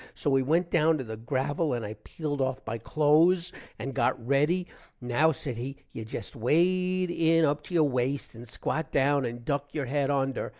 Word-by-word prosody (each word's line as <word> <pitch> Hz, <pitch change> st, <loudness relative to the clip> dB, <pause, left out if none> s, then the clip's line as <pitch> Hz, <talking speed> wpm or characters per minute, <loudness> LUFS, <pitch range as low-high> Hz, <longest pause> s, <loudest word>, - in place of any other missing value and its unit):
so -, -, -1 dB
we 135 Hz, 0 st, +4 dB
went 165 Hz, +6 st, +1 dB
down 160 Hz, -1 st, +3 dB
to 135 Hz, -, -4 dB
the 110 Hz, -2 st, -6 dB
gravil 135 Hz, +6 st, -1 dB
and 115 Hz, -2 st, -4 dB
i 105 Hz, -, -5 dB
peeled 145 Hz, -3 st, -4 dB
off 130 Hz, 0 st, 0 dB
my 110 Hz, -, -2 dB
close 160 Hz, -, +3 dB, 0.3 s
and 135 Hz, -, -4 dB
got 120 Hz, -2 st, 0 dB
ready, 150 Hz, +7 st, +2 dB, 0.3 s
now 125 Hz, +6 st, +2 dB
said 135 Hz, -3 st, -5 dB
he, 130 Hz, +4 st, -5 dB, 0.2 s
you 115 Hz, -, -5 dB
jest 110 Hz, -, -7 dB
wade 180 Hz, +8 st, +2 dB
in 165 Hz, -1 st, +3 dB
up 145 Hz, 0 st, 0 dB
to 180 Hz, -, -6 dB
your 155 Hz, -3 st, +5 dB
waste 130 Hz, +1 st, -1 dB
and 120 Hz, +1 st, -11 dB
squat 155 Hz, +7 st, -3 dB
down 140 Hz, 0 st, +2 dB
and 120 Hz, 0 st, -6 dB
duck 140 Hz, +2 st, -2 dB
your 145 Hz, -3 st, -1 dB
head 140 Hz, +2 st, 0 dB
under. 135 Hz, -2 st, 0 dB
140 Hz, 200 wpm, -28 LUFS, 125-160 Hz, 0.3 s, your